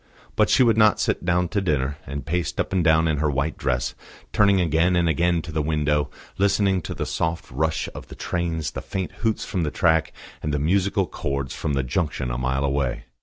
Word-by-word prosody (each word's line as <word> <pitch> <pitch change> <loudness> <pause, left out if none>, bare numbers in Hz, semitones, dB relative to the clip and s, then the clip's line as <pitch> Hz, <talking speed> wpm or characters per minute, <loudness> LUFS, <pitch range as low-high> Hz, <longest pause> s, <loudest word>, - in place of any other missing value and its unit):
But - - +3
she 130 - +5
would 115 -2 +3
not 110 -1 +5
sit - - 0
down 90 0 +2
to 100 +1 0
dinner, 70 -5 -1
and 70 +1 -5
paced 85 +2 -2
up - - -1
and 90 -2 +2
down 80 +1 +4
in 80 -2 +1
her 75 +1 +1
white 70 +3 -1
dress, 60 -2 -1 0.4
turning 100 -2 +4
again 85 +1 +2
and 85 -1 +2
again 85 +1 +2
to 85 - -7
the 80 0 0
window, 75 -1 0 0.3
listening 100 -1 +2
to - - -6
the - - -3
soft 80 0 -2
rush 80 +5 -1
of - - -9
the - - -10
trains, 85 -4 -2
the - - -5
faint 95 -2 -4
hoots 110 -1 0
from 90 - -2
the 80 - 0
track, 80 -1 +2 0.3
and 75 - -2
the 75 - 0
musical 95 +6 +1
chords 70 -5 -3
from 75 - -2
the 70 -1 +1
junction 65 -3 -2
a - - -2
mile 65 +2 0
away. 70 -3 -1
80 Hz, 220 wpm, -24 LUFS, 70-90 Hz, 0.4 s, she